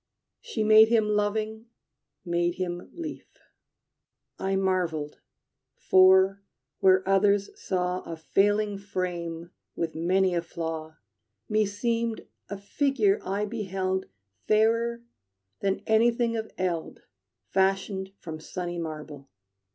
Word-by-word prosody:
She 255 Hz, -, -3 dB
made 215 Hz, +1 st, +7 dB
him 220 Hz, -2 st, +2 dB
loving, 215 Hz, +2 st, -1 dB, 0.6 s
made 175 Hz, 0 st, 0 dB
him 175 Hz, -1 st, -4 dB
lief. 330 Hz, -3 st, -7 dB, 1.1 s
I 195 Hz, 0 st, 0 dB
marveled; 180 Hz, -6 st, -1 dB, 0.6 s
for, 190 Hz, +1 st, +5 dB, 0.4 s
where 190 Hz, 0 st, +4 dB
others 200 Hz, +1 st, +3 dB
saw 180 Hz, -1 st, -2 dB
A 165 Hz, -, -7 dB
failing 205 Hz, +4 st, +1 dB
frame 175 Hz, -4 st, -4 dB, 0.2 s
with 165 Hz, -1 st, -2 dB
many 185 Hz, +3 st, +2 dB
a 170 Hz, -, +1 dB
flaw, 160 Hz, -1 st, -6 dB, 0.5 s
Meseemed 220 Hz, +2 st, -1 dB, 0.2 s
a 200 Hz, -, -4 dB
figure 215 Hz, 0 st, +1 dB
I 200 Hz, +2 st, -1 dB
beheld 190 Hz, -3 st, -2 dB, 0.4 s
Fairer 230 Hz, +2 st, +2 dB, 0.6 s
than 195 Hz, 0 st, -1 dB
anything 230 Hz, +1 st, +2 dB
of 220 Hz, -1 st, -4 dB
eld 175 Hz, -3 st, -3 dB, 0.5 s
Fashioned 190 Hz, 0 st, 0 dB
from 160 Hz, -2 st, -8 dB
sunny 175 Hz, +2 st, -5 dB
marble. 150 Hz, -3 st, -7 dB
195 Hz, 105 wpm, -27 LUFS, 175-215 Hz, 1.1 s, made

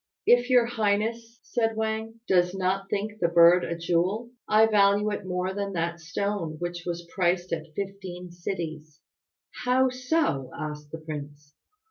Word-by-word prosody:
"If 245 Hz, +1 st, +5 dB
your 250 Hz, -2 st, +5 dB
highness," 230 Hz, +1 st, -1 dB
said 225 Hz, -2 st, 0 dB
Wang, 220 Hz, +1 st, -3 dB
"does 180 Hz, 0 st, +3 dB
not 190 Hz, +1 st, -1 dB
think 210 Hz, +2 st, -3 dB
the 170 Hz, -, +3 dB
bird 170 Hz, +1 st, +6 dB
a 170 Hz, -, -3 dB
jewel, 180 Hz, +8 st, 0 dB, 0.2 s
I 215 Hz, +1 st, +6 dB
value 205 Hz, -1 st, +3 dB
it 205 Hz, -, -4 dB
more 180 Hz, +1 st, -1 dB
than 200 Hz, 0 st, -3 dB
that 170 Hz, 0 st, -2 dB
stone 165 Hz, +1 st, -3 dB
which 175 Hz, +1 st, -5 dB
was 175 Hz, 0 st, -3 dB
priced 175 Hz, -1 st, +1 dB
at 160 Hz, -1 st, -5 dB
fifteen 190 Hz, -3 st, -6 dB
cities." 160 Hz, -4 st, -6 dB, 0.6 s
"How 255 Hz, +1 st, +3 dB
so?" 255 Hz, -, 0 dB
asked 150 Hz, -1 st, -6 dB
the 160 Hz, -, -5 dB
prince. 145 Hz, -2 st, -8 dB
185 Hz, 150 wpm, -27 LUFS, 170-220 Hz, 0.6 s, bird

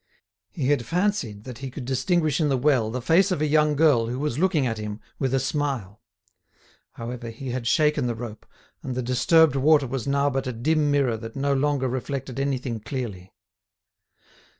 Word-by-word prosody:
He 140 Hz, -5 st, -2 dB
had 145 Hz, -4 st, +2 dB
fancied 170 Hz, -, -1 dB
that 125 Hz, -2 st, -9 dB
he 135 Hz, -, -5 dB
could 130 Hz, 0 st, -7 dB
distinguish 155 Hz, +4 st, +1 dB
in 150 Hz, -, +2 dB
the 135 Hz, -, +2 dB
well 125 Hz, -5 st, +2 dB
the 125 Hz, +2 st, -4 dB
face 170 Hz, +9 st, +4 dB
of 185 Hz, -, -1 dB
a 155 Hz, -, +1 dB
young 150 Hz, 0 st, +3 dB
girl 140 Hz, -7 st, +4 dB
who 125 Hz, +2 st, -3 dB
was 145 Hz, -1 st, -2 dB
looking 170 Hz, -6 st, +2 dB
at 115 Hz, -3 st, -2 dB
him 105 Hz, 0 st, -5 dB, 0.2 s
with 135 Hz, -2 st, 0 dB
a 135 Hz, -, +2 dB
smile; 130 Hz, -7 st, -2 dB, 0.9 s
however, 120 Hz, 0 st, -6 dB
he 125 Hz, +4 st, -7 dB
had 120 Hz, -1 st, -3 dB
shaken 150 Hz, -1 st, +2 dB
the 120 Hz, -, -2 dB
rope, 110 Hz, -2 st, -8 dB, 0.3 s
and 130 Hz, -2 st, -5 dB
the 130 Hz, -, -2 dB
disturbed 145 Hz, +5 st, +4 dB
water 145 Hz, +1 st, +4 dB
was 135 Hz, +1 st, -4 dB
now 140 Hz, 0 st, +2 dB
but 135 Hz, -1 st, -1 dB
a 130 Hz, -, -2 dB
dim 150 Hz, +6 st, +1 dB
mirror 140 Hz, -5 st, +2 dB
that 115 Hz, 0 st, -9 dB
no 140 Hz, +1 st, 0 dB
longer 140 Hz, -1 st, +1 dB
reflected 130 Hz, 0 st, -4 dB
anything 130 Hz, -4 st, -2 dB
clearly. 110 Hz, -6 st, -6 dB
135 Hz, 190 wpm, -25 LUFS, 120-150 Hz, 0.9 s, face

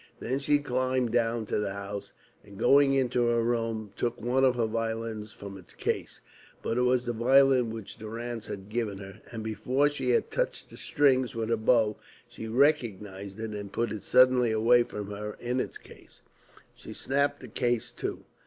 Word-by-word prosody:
Then 130 Hz, +3 st, -2 dB
she 145 Hz, +1 st, +3 dB
climbed 130 Hz, -3 st, 0 dB
down 115 Hz, -1 st, +1 dB
to 105 Hz, -, -1 dB
the 100 Hz, -2 st, -2 dB
house, 100 Hz, 0 st, -6 dB, 0.3 s
and 100 Hz, -1 st, -14 dB
going 140 Hz, +3 st, +5 dB
into 125 Hz, -2 st, +2 dB
her 120 Hz, -1 st, +2 dB
room 115 Hz, -3 st, -1 dB
took 120 Hz, 0 st, -2 dB
one 130 Hz, +2 st, +1 dB
of 130 Hz, -1 st, +4 dB
her 120 Hz, -2 st, +1 dB
violins 115 Hz, -1 st, -3 dB
from 100 Hz, -1 st, -9 dB
its 90 Hz, -, -16 dB
case. -, -, -3 dB, 0.4 s
But 115 Hz, -, 0 dB
it -, -, +3 dB
was 125 Hz, 0 st, +2 dB
the 120 Hz, -, -1 dB
violin 130 Hz, +1 st, +4 dB
which 110 Hz, -3 st, -8 dB
Durrance 115 Hz, 0 st, -5 dB
had 95 Hz, -1 st, -7 dB
given 110 Hz, -2 st, -2 dB
to 100 Hz, -, -8 dB
her, 95 Hz, +2 st, -11 dB
and 115 Hz, -2 st, -5 dB
before 130 Hz, +6 st, +1 dB
she 145 Hz, -, -3 dB
had 460 Hz, -, +2 dB
touched -, -, -2 dB
the -, -, -11 dB
strings 130 Hz, -5 st, +2 dB
with 115 Hz, -1 st, -2 dB
her 115 Hz, -, +3 dB
bow 110 Hz, -1 st, +2 dB, 0.3 s
she 110 Hz, -, -8 dB
recognised 105 Hz, -7 st, 0 dB
it 110 Hz, -1 st, -4 dB
and 100 Hz, -2 st, -6 dB
put 115 Hz, 0 st, -1 dB
it 105 Hz, -2 st, -5 dB
suddenly 125 Hz, -2 st, +5 dB
away 115 Hz, +3 st, +5 dB
from 105 Hz, -3 st, -5 dB
her 105 Hz, +1 st, -6 dB
in 125 Hz, +1 st, -1 dB
its -, -, -3 dB
case. -, -, -17 dB, 0.5 s
She -, -, -10 dB
snapped 140 Hz, +2 st, 0 dB
the -, -, -9 dB
case 120 Hz, -3 st, -1 dB
to. -, -, -4 dB
115 Hz, 190 wpm, -28 LUFS, 110-125 Hz, 0.5 s, going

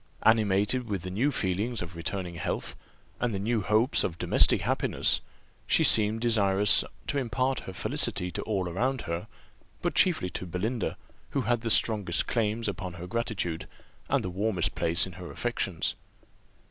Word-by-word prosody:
Animated 110 Hz, +2 st, +2 dB
with 95 Hz, -4 st, -2 dB
the 90 Hz, -, -5 dB
new 120 Hz, +10 st, +1 dB
feelings 105 Hz, -1 st, -1 dB
of 85 Hz, 0 st, -9 dB
returning 90 Hz, +1 st, -4 dB
health, 85 Hz, -, -4 dB, 0.4 s
and 120 Hz, -4 st, -1 dB
the -, -, -2 dB
new 110 Hz, +2 st, 0 dB
hopes 110 Hz, +6 st, +2 dB
of 85 Hz, -, -2 dB
domestic -, -, +4 dB
happiness, -, -, +1 dB, 0.5 s
she -, -, +4 dB
seemed 110 Hz, +1 st, +5 dB
desirous 105 Hz, -4 st, +4 dB, 0.2 s
to 145 Hz, -, -1 dB
impart 130 Hz, +2 st, 0 dB
her 95 Hz, -, -8 dB
felicity 90 Hz, 0 st, 0 dB
to -, -, -4 dB
all 95 Hz, -4 st, -1 dB
around 125 Hz, +9 st, -1 dB
her, 85 Hz, 0 st, -4 dB, 0.6 s
but -, -, 0 dB
chiefly 155 Hz, -, +3 dB
to 95 Hz, -, -5 dB
Belinda, 105 Hz, +6 st, -2 dB, 0.4 s
who -, -, +2 dB
had 120 Hz, 0 st, 0 dB
the 115 Hz, -, -2 dB
strongest 105 Hz, -6 st, +3 dB
claims 115 Hz, -1 st, 0 dB
upon 95 Hz, -3 st, -4 dB
her 85 Hz, 0 st, -8 dB
gratitude, 95 Hz, -5 st, -3 dB, 0.4 s
and -, -, +2 dB
the 90 Hz, -, -3 dB
warmest 95 Hz, -1 st, 0 dB
place 85 Hz, +2 st, +2 dB
in 95 Hz, -, -8 dB
her 90 Hz, 0 st, -9 dB
affections. 100 Hz, -8 st, -2 dB
105 Hz, 160 wpm, -28 LUFS, 90-115 Hz, 0.6 s, seemed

